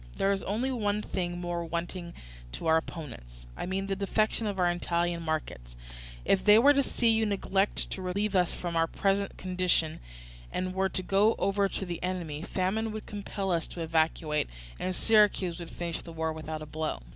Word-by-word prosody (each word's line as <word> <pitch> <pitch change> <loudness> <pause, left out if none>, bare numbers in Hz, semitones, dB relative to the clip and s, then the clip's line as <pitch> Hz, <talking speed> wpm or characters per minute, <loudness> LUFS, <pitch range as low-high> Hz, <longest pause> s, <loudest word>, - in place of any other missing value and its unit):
There 195 - +2
is 195 -1 0
only 230 +7 -1
one 210 -4 0
thing 175 -1 -2
more 175 -1 -2
wanting 170 +1 -4 0.4
to - - -5
our 160 0 +5
opponents, - - -7
I - - -4
mean 190 +1 -1
the 195 0 -1
defection 215 +3 +1
of 200 -2 -2
our 175 -1 +3
Italian 175 0 0
markets. 150 - -3 0.5
If 190 - +3
they 210 0 +8
were 280 +6 +7
to 280 - +4
see 240 -3 +2
you 225 0 +4
neglect 200 0 0
to 190 - -3
relieve 200 +3 -1
us 180 -2 +3
from 175 -1 -4
our 165 0 +3
present 195 +3 0
condition, 180 -3 0 0.5
and 185 0 -2
were 190 0 +1
to 185 - -3
go 200 +4 +4
over 200 0 +2
to 195 - -3
the 175 -2 -5
enemy, 175 -5 -3
famine 195 +6 -1
would 215 - -6
compel 200 -2 -3
us 165 -2 +1
to 170 - -7
evacuate, 160 - +1 0.3
and 185 0 -1
Syracuse 205 -5 +3
would 170 -1 -7
finish 170 -1 -4
the 165 - -10
war 160 0 -1
without 155 0 -5
a - - -6
blow. 155 - -3
180 Hz, 190 wpm, -29 LUFS, 165-200 Hz, 0.5 s, they